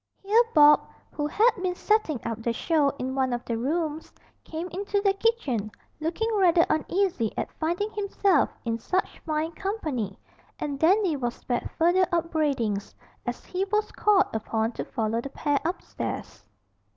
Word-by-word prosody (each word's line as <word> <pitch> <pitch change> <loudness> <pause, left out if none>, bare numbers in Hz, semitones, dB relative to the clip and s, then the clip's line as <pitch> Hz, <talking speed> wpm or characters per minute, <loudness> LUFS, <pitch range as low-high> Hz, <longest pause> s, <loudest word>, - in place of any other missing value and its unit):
Here 425 +4 +5
Bob, 295 -1 +8 0.3
who 295 -1 -2
had 445 +10 +4
been 365 -1 -1
setting 420 - +1
up 225 -1 -3
the 235 +1 0
show 300 +2 +2
in 260 +1 -3
one 260 -2 +1
of 240 0 -3
the 235 - -2
rooms, 310 +5 -2 0.3
came 325 +2 -5
into 400 +3 -1
the 400 -1 +3
kitchen, 390 - 0 0.3
looking 330 +8 -1
rather 350 -3 +5
uneasy 335 - 0
at - - -2
finding 345 +7 -1
himself 400 -6 +2 0.2
in 230 0 -1
such 370 +11 -2
fine 315 +1 -2
company, 310 - -3 0.4
and 285 -2 -4
Dandy 365 +1 +4
was 240 -3 -2
spared 245 -1 -3
further 350 +2 +4
upbraidings, 295 - 0 0.3
as - - -4
he 370 +1 -2
was 425 +1 0
called 415 -2 +4
upon 220 +1 -1
to - - -5
follow 225 0 -1
the 275 - -6
pair 285 +1 0
upstairs. 340 +4 -5
315 Hz, 155 wpm, -26 LUFS, 255-385 Hz, 0.4 s, Bob